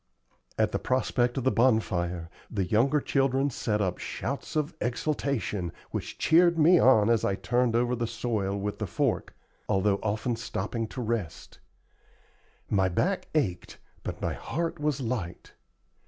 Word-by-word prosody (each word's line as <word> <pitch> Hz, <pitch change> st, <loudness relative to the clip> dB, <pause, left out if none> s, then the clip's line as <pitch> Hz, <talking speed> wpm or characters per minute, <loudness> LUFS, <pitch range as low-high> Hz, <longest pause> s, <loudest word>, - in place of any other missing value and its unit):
At -, -, +2 dB
the -, -, -1 dB
prospect 125 Hz, -1 st, 0 dB
of 130 Hz, -, -1 dB
the 130 Hz, -, +3 dB
bonfire 90 Hz, -8 st, +1 dB, 0.2 s
the 100 Hz, -4 st, -1 dB
younger 125 Hz, +10 st, +3 dB
children 135 Hz, 0 st, +1 dB
set 105 Hz, -3 st, -1 dB
up 95 Hz, -3 st, -1 dB
shouts 140 Hz, +4 st, -4 dB
of 150 Hz, -1 st, 0 dB
exultation, 120 Hz, -, -1 dB, 0.2 s
which -, -, -5 dB
cheered 170 Hz, +1 st, +4 dB
me 165 Hz, +3 st, +6 dB
on 110 Hz, -5 st, +5 dB
as 115 Hz, -2 st, +2 dB
I 100 Hz, -, +1 dB
turned 120 Hz, +5 st, +1 dB
over 120 Hz, +1 st, +2 dB
the 120 Hz, -1 st, -2 dB
soil 110 Hz, -4 st, -2 dB
with 100 Hz, +1 st, -3 dB
the -, -, -2 dB
fork, -, -, -1 dB, 0.3 s
although 100 Hz, +1 st, +2 dB
often 110 Hz, +3 st, -1 dB
stopping 115 Hz, 0 st, -3 dB
to 125 Hz, -, -6 dB
rest. 110 Hz, -7 st, -4 dB, 1.1 s
My 95 Hz, -2 st, +2 dB
back 180 Hz, -, 0 dB
ached, 95 Hz, -, -1 dB, 0.2 s
but -, -, -6 dB
my -, -, 0 dB
heart 170 Hz, +1 st, -3 dB
was 150 Hz, -2 st, 0 dB
light. 110 Hz, -8 st, -4 dB
115 Hz, 150 wpm, -28 LUFS, 100-135 Hz, 1.1 s, me